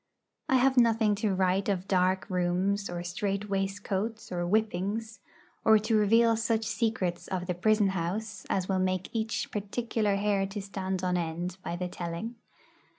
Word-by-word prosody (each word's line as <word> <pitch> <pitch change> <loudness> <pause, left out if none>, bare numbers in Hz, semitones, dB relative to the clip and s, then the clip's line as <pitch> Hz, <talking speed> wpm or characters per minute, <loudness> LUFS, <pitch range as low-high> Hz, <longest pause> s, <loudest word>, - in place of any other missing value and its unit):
I 265 - +4
have 260 +1 +4
nothing 225 -3 +4
to 205 -4 +1
write 190 +1 +1
of 190 -1 -1
dark 185 0 +2
rooms 185 +2 0
or 175 0 -4
strait 200 +3 -3
waistcoats 195 +3 -2
or 175 -1 -1
whippings, 215 +2 -1 0.4
or 220 -1 +7
to 220 +2 0
reveal 225 +2 +5
such 225 0 0
secrets 215 -5 -1
of 180 -2 -3
the 180 - -1
prison 210 +3 +3
house 190 +4 -3
as 185 -1 0
will 190 -1 +1
make 185 0 -1
each 220 -1 -2
particular 210 0 -1
hair 200 -1 +1
to 200 +2 -5
stand 190 -2 -3
on 180 -1 +1
end 175 +2 -3
by 170 - -3
the 180 +1 -3
telling. 175 +6 -5
195 Hz, 160 wpm, -29 LUFS, 185-220 Hz, 0.4 s, or